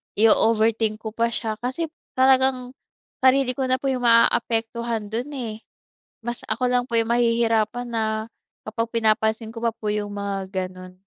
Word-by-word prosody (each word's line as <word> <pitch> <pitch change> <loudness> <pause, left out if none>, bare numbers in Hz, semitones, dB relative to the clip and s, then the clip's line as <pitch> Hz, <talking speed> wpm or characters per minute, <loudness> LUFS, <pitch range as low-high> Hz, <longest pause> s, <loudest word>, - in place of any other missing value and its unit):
io-overthink 220 0 +3
ko 220 - -4
pa 230 +1 +1
siya 220 -1 -3
kasi 280 +6 -3 0.2
talagang 260 -1 +3 0.5
sarili 260 0 +4
ko 260 +1 -2
na 255 - +3
po 270 +1 -1
yung 250 -2 -2
maaapektuhan 230 -1 +2
dun 240 +5 -2
eh. 225 -4 -5 0.7
Mas 240 0 -3
ako 240 +4 0
lang 245 0 +2
po 235 - -3
yung 225 0 -1
mahihirapan 235 0 +1
na 225 -1 -1 0.6
kapag 230 +1 -2
pinapansin 220 0 +1
ko - - -13
pa 230 - +2
po 215 -2 -4
yung 205 -1 -3
mga 195 -1 -4
gano'n. 185 0 -12
230 Hz, 155 wpm, -23 LUFS, 220-245 Hz, 0.7 s, sarili